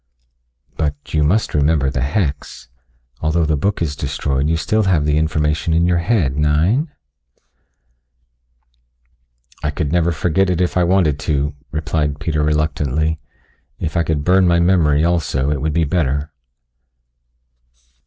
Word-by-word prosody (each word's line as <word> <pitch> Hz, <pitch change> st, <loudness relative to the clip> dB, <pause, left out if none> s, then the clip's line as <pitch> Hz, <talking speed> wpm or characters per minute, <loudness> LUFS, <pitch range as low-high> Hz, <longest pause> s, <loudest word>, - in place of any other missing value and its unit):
"But 75 Hz, -1 st, -3 dB
you 75 Hz, -1 st, +2 dB
must 100 Hz, +9 st, +1 dB
remember 75 Hz, -2 st, +2 dB
the 65 Hz, -, -2 dB
hex. 70 Hz, -, -3 dB, 0.5 s
Although 80 Hz, +2 st, +1 dB
the 75 Hz, 0 st, +1 dB
book 95 Hz, +4 st, -1 dB
is 75 Hz, -3 st, -2 dB
destroyed 70 Hz, +1 st, -2 dB
you 80 Hz, -, +1 dB
still 110 Hz, +6 st, 0 dB
have 85 Hz, -6 st, +2 dB
the 75 Hz, 0 st, +1 dB
information 75 Hz, +1 st, 0 dB
in 85 Hz, +1 st, +3 dB
your 90 Hz, -1 st, +2 dB
head, 85 Hz, -, 0 dB
nein?" 85 Hz, -, +2 dB, 2.7 s
"I 75 Hz, -, -1 dB
could 75 Hz, -1 st, -3 dB
never 85 Hz, 0 st, +2 dB
forget 90 Hz, +3 st, +1 dB
it 90 Hz, -2 st, 0 dB
if 90 Hz, -1 st, 0 dB
I 90 Hz, -, +3 dB
wanted 85 Hz, -6 st, +2 dB
to," 75 Hz, 0 st, -1 dB, 0.2 s
replied 75 Hz, -1 st, -2 dB
Peter 75 Hz, -2 st, -1 dB
reluctantly. 75 Hz, 0 st, 0 dB, 0.6 s
"If 80 Hz, -2 st, -4 dB
I 85 Hz, -, +3 dB
could 80 Hz, -3 st, -1 dB
burn 90 Hz, +2 st, +4 dB
my 85 Hz, 0 st, +3 dB
memory 85 Hz, -4 st, +3 dB
also 75 Hz, -5 st, 0 dB
it 75 Hz, -3 st, -2 dB
would 80 Hz, +1 st, -1 dB
be 85 Hz, +1 st, +2 dB
better." 75 Hz, -2 st, -1 dB
80 Hz, 145 wpm, -18 LUFS, 75-85 Hz, 2.7 s, burn